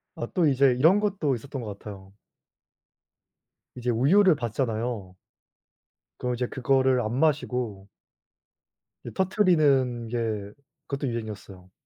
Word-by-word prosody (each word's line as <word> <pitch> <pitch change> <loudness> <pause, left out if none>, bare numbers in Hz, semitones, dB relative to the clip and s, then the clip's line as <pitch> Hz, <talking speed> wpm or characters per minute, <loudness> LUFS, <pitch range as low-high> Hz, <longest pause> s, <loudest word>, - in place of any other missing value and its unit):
아 - - -4
또 175 -4 +2
이제 135 -1 +4
이런 165 +10 +5
것도 190 -10 0
있었던 135 +3 -7
것 105 -3 -7
같아요. 95 -2 -11 1.6
이제 125 -1 -3
우유를 160 - +4
받잖아요. 115 -5 -3 1.0
그럼 125 -1 -2
이제 125 0 -2
그거를 130 -1 +2
안 110 +1 -3
마시고 125 -10 -1 1.2
이 - - -7
터트리는 150 - +2
게 110 -4 -3 0.4
그것도 140 0 -3
유행이었어요. 105 -5 -7
125 Hz, 255 characters per minute, -26 LUFS, 110-140 Hz, 1.6 s, 이런